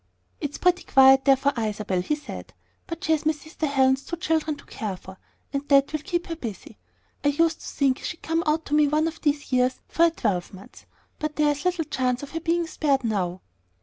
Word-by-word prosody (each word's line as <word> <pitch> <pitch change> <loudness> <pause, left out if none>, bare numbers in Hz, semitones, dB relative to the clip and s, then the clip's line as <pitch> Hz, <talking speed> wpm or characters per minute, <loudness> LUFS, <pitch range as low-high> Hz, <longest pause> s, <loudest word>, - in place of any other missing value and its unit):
"It's 290 -2 -4
pretty 360 0 +2
quiet 265 0 +6
there 275 -1 +7
for 280 +2 0
Isabel," 210 -5 -1
he 300 +12 -1
said; 295 - -9 0.3
"but 335 +2 -6
she 320 - 0
has 315 -2 +2
my 310 0 +2
sister 310 +1 -5
Helen's 265 -1 +2
two 340 - -5
children 320 -2 0
to - - -16
care 200 -4 -5
for, 190 +1 -13 0.3
and 280 +1 -3
that 275 +1 +4
will 310 - 0
keep 345 +2 -2
her 335 - -5
busy. 230 - -8 0.4
I - - +2
used 320 +3 +2
to - - -9
think 275 -2 +1
she'd 320 - -6
come 325 +1 0
out 315 +1 +1
to 290 - -5
me 300 -1 +5
one 305 +2 +2
of 325 -1 -6
these 290 -2 -1
years 255 0 +2
for 335 - +3
a - - +5
twelvemonth; 195 - -4 0.3
but 305 0 -3
there's 295 +1 +1
little 355 -3 +1
chance 255 -3 -1
of 285 - -8
her 325 - -3
being 335 +1 0
spared 280 -4 0
now." 185 -5 -1
290 Hz, 215 wpm, -25 LUFS, 260-320 Hz, 0.4 s, there